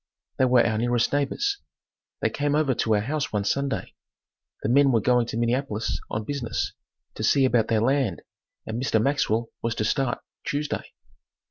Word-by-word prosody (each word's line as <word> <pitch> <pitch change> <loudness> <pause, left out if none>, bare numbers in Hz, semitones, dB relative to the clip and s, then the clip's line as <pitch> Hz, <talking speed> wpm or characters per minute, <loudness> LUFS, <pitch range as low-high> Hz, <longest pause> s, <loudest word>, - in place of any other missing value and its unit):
They 130 - +5
were 125 -1 +5
our 110 -1 +1
nearest 120 +1 +1
neighbors. 395 - 0 0.6
They - - +1
came 145 0 0
over 150 -3 +2
to 110 -2 +1
our 105 - +2
house 140 +3 -2
one 105 -2 0
Sunday. 140 +5 -1 0.7
The - - 0
men 140 +2 +5
were 115 - +4
going 120 +2 +2
to 115 - -4
Minneapolis 120 -2 -1
on 105 - -2
business, 120 -2 -3 0.4
to - - -6
see 135 +4 +4
about 120 -3 +3
their 110 -2 +2
land 130 -6 +1 0.4
and 110 +2 -3
Mr. 115 -4 +2
Maxwell 115 -2 +1
was 115 -1 -1
to 110 - -1
start, 130 +1 +1 0.3
Tuesday. 145 +1 -2
120 Hz, 170 wpm, -25 LUFS, 110-140 Hz, 0.7 s, They